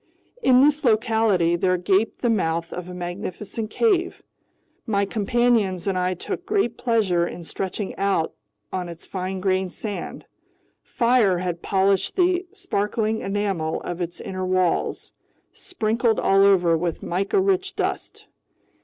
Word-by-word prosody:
In 255 - +5
this 295 +1 +3
locality 220 -7 +3
there 185 +1 +1
gaped 195 +7 0
the 240 - +3
mouth 165 -5 -1
of 180 0 -6
a - - -7
magnificent 185 +4 -5
cave. 375 - +1 0.6
My 200 -2 +1
companions 215 -3 +1
and 195 -2 0
I 180 0 0
took 180 - -5
great 395 - 0
pleasure 200 -9 +1
in 175 - -8
stretching 190 +4 -4
out 195 -5 0 0.4
on 180 -2 -3
its 170 0 -10
fine 185 0 -4
grained 185 -1 0
sand. 205 -5 -6 0.6
Fire 235 -6 +2
had 175 -1 -3
polished 195 0 +1
the 360 0 +2
sparkling 220 - -1
enamel 195 -5 -1
of 175 +1 -5
its 175 0 -4
inner 185 0 -5
walls, 185 -1 0 0.4
sprinkled 230 - 0
all 195 0 +4
over 180 -4 +4
with 165 0 -2
mica 195 - 0
rich 385 0 +1
dust. - - -3
195 Hz, 135 wpm, -23 LUFS, 180-230 Hz, 0.6 s, In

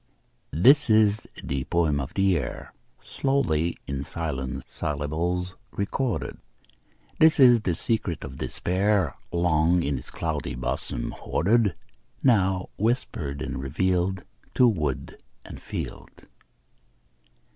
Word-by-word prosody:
This 135 - +6
is 110 -1 +4 0.2
the 70 -1 -2
poem 80 -3 +1
of 70 +1 -5
the 95 -2 +3
air, 70 -7 -4 0.3
Slowly 85 - 0
in 70 0 -3
silent 70 -5 -4
syllables 80 +5 -2 0.2
recorded; 100 - -2 0.8
This 160 -1 +6
is 125 -4 +7
the 90 -5 0
secret 100 -4 -1
of - - -8
despair, 95 -4 0 0.2
Long 85 0 +2
in 70 -2 -1
its - - -7
cloudy - - -3
bosom 60 - -3
hoarded, 105 +2 +1 0.5
Now 95 -7 +3
whispered 90 - -1
and - - -4
revealed 90 +6 0 0.3
To 125 - +6
wood 75 - -2 0.2
and - - -10
field. - - -7
90 Hz, 110 wpm, -26 LUFS, 75-105 Hz, 0.8 s, is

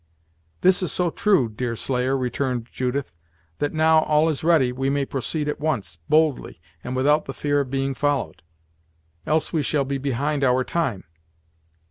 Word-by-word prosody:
"This 185 0 +4
is 180 - -2
so 175 -2 0
true, 190 - +2
Deerslayer," 125 +3 -1
returned 125 -1 -2
Judith, 130 - -2 0.5
"that 145 - 0
now 160 0 +4
all 155 +1 +2
is 155 -2 -3
ready, 155 -7 +4
we 135 +2 -1
may 140 0 0
proceed 145 +4 -3
at 150 - -2
once, 110 - -2
boldly, 155 -2 +1 0.2
and 125 - -4
without 150 +4 +2
the 135 - -7
fear 145 -1 0
of 140 -2 -2
being 135 +1 -1
followed; 130 - -1 0.9
else 155 +1 0
we 160 - +2
shall 145 0 0
be 135 0 -2
behind 140 +2 -1
our 130 0 +3
time." 130 - -2
140 Hz, 160 wpm, -23 LUFS, 125-155 Hz, 0.9 s, This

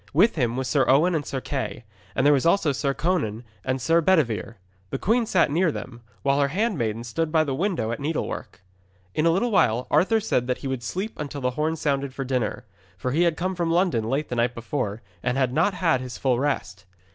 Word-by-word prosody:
With 190 +10 +5
him 120 -5 0
was 130 -1 -2
Sir 140 0 +3
Owen 155 +7 +4
and 155 -3 0
Sir 135 - -2
Kay, 130 -3 -4 0.3
and 130 - +1
there 145 - +7
was 135 - +2
also 170 -2 +3
Sir 140 +1 0
Conan 135 - -1 0.2
and 130 0 -1
Sir 165 +7 +3
Bedevere. 140 - +1 0.3
The - - -2
queen 225 - +1
sat 185 -9 +3
near 170 +2 +2
them, 120 -4 -8 0.2
while 140 0 +2
her 140 - +3
handmaidens 140 - -1
stood 165 +6 -1
by 160 -1 +4
the 140 -3 -2
window 165 - -1
at 115 - -3
needlework. 145 - -4 0.5
In 155 - +2
a - - +6
little 195 +8 +1
while 125 - +3
Arthur 220 +4 +4
said 130 - 0
he 140 - -6
would 130 -2 -2
sleep 185 - -4
until 145 -1 -5
the 125 0 +1
horn 155 +5 -1
sounded 140 -3 -1
for 135 - -3
dinner. 125 -2 -2 0.3
For 125 - -2
he 155 +6 +2
had 170 -2 +2
come 185 +2 -1
from 170 -2 -1
London 170 - +2
late 135 +6 -1
the 125 - -2
night 120 +1 +1
before, 115 -3 -3 0.2
and 125 +4 -1
had 130 -2 +1
not 175 +7 +2
had 165 -8 +2
his 125 -1 -6
full 125 -3 +1
rest. 100 -9 -2
140 Hz, 220 wpm, -25 LUFS, 125-170 Hz, 0.5 s, there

